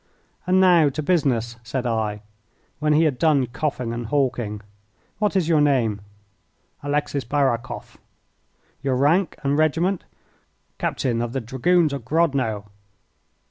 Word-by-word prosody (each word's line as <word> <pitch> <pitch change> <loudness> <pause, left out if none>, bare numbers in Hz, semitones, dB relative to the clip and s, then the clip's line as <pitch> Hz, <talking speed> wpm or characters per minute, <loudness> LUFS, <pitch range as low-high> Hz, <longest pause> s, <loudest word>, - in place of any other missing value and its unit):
"And 185 +1 +4
now 175 -5 +5
to 150 +3 -4
business," 125 -9 +1
said 125 +2 -4
I, 110 -3 -1 0.6
when 150 0 +2
he 155 +2 +4
had 145 -6 0
done 150 -5 +3
coughing 125 -2 -3
and 115 -1 -4
hawking. 120 -6 -1 0.6
"What 210 -1 0
is 180 -4 +2
your 160 -3 +3
name?" 120 -8 +2 0.8
"Alexis 145 -1 -1
Barakoff." 130 -2 -2 0.8
"Your 135 -2 0
rank 155 +8 +2
and 140 +2 +1
regiment?" 165 +5 +1 0.7
"Captain 120 -3 -1
of 120 0 -3
the 135 - -1
Dragoons 140 +7 +1
of 140 -4 -5
Grodno." 130 -9 0
140 Hz, 130 wpm, -23 LUFS, 120-155 Hz, 0.8 s, now